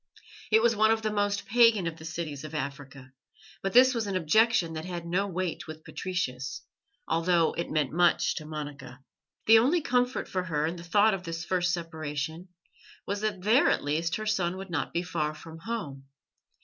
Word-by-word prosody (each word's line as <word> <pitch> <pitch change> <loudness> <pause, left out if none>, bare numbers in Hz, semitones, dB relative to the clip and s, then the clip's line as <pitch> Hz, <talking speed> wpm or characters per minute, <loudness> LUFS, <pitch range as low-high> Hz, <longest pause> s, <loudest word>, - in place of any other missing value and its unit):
It 220 +1 +5
was 235 -1 +4
one 215 +1 +4
of 220 0 +1
the 215 - 0
most 205 -1 0
pagan 230 -5 +4
of 165 -1 -3
the 160 - -11
cities 155 -3 -5
of 155 +1 -7
Africa, 140 -3 -6 0.5
but 195 - -2
this 255 +2 +7
was 230 -3 -2
an 195 - -2
objection 185 +1 +3
that 160 0 -5
had 175 -1 -5
no 185 +4 0
weight 180 -3 -3
with 155 0 -9
Patricius, 135 -9 -4 0.4
although 165 0 +2
it 170 - -3
meant 150 -4 0
much 175 0 +3
to 155 - -6
Monica. 145 -4 -7 0.5
The 225 0 +8
only 295 +9 +2
comfort 250 -1 0
for 185 - -2
her 150 -3 0
in 165 +2 -3
the 170 - -9
thought 205 +5 +3
of 195 - -3
this 165 -1 -5
first 180 -1 +1
separation 160 -1 -4 0.6
was 200 +1 -3
that 205 -4 -2
there 225 +7 +4
at - - +1
least 160 +3 -1
her 215 - -4
son 185 -4 0
would 190 -1 -8
not 160 - -2
be 170 - -1
far 155 -4 -2
from 160 +1 -11
home. 165 -10 -5
175 Hz, 195 wpm, -28 LUFS, 155-210 Hz, 0.6 s, The